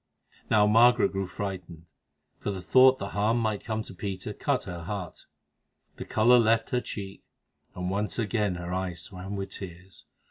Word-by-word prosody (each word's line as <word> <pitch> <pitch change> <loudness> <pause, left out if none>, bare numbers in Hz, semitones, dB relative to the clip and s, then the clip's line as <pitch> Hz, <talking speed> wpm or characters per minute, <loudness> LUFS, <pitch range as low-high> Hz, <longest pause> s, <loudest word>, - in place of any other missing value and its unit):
Now 105 -2 +5
Margaret 120 +3 +5
grew 95 -1 -2
frightened, 90 -4 -6 0.5
for - - -3
the 95 -2 -4
thought 130 +5 +6
that 100 - -5
harm 105 +3 +1
might 110 -3 -1
come 110 0 -2
to - - -11
Peter 95 +1 -5
cut 140 +3 -1
her 90 -2 -6
heart. 100 -3 -6 0.7
The - - -6
colour 120 +3 +5
left 115 0 +2
her 125 - +1
cheek, 100 -4 -7 0.5
and 90 0 -3
once 105 +2 -1
again 105 -4 0
her 85 0 -5
eyes 90 -2 -3
swam 95 +2 -6
with 100 -1 -5
tears. 90 0 -10
100 Hz, 170 wpm, -28 LUFS, 95-110 Hz, 0.7 s, thought